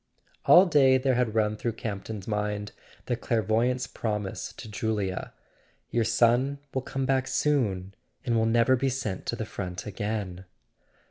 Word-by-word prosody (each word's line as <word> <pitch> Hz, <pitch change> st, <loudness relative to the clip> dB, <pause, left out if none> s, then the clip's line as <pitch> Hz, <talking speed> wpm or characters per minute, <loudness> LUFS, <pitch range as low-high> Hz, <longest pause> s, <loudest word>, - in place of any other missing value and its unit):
All 180 Hz, +2 st, +8 dB
day 135 Hz, -6 st, +5 dB
there 130 Hz, 0 st, +1 dB
had 120 Hz, -3 st, 0 dB
run 105 Hz, -1 st, +2 dB
through 115 Hz, +2 st, -2 dB
Campton's 105 Hz, -2 st, -5 dB
mind 105 Hz, -1 st, -2 dB, 0.3 s
the 120 Hz, -, 0 dB
clairvoyant# 115 Hz, +2 st, +1 dB
s -, -, -1 dB
promise 105 Hz, -3 st, -4 dB
to -, -, -10 dB
Julia: 105 Hz, -3 st, -2 dB, 0.6 s
"Your 115 Hz, -1 st, +1 dB
son 120 Hz, +5 st, +3 dB, 0.2 s
will 130 Hz, -, 0 dB
come 135 Hz, 0 st, -3 dB
back 130 Hz, 0 st, +1 dB
soon, 100 Hz, -11 st, 0 dB, 0.3 s
and 120 Hz, -3 st, +1 dB
will 110 Hz, 0 st, +3 dB
never 115 Hz, +3 st, +4 dB
be 135 Hz, +2 st, 0 dB
sent 110 Hz, -7 st, -4 dB
to -, -, -1 dB
the -, -, -4 dB
front 90 Hz, -2 st, -6 dB
again." 100 Hz, -3 st, -4 dB
115 Hz, 155 wpm, -27 LUFS, 105-130 Hz, 0.6 s, All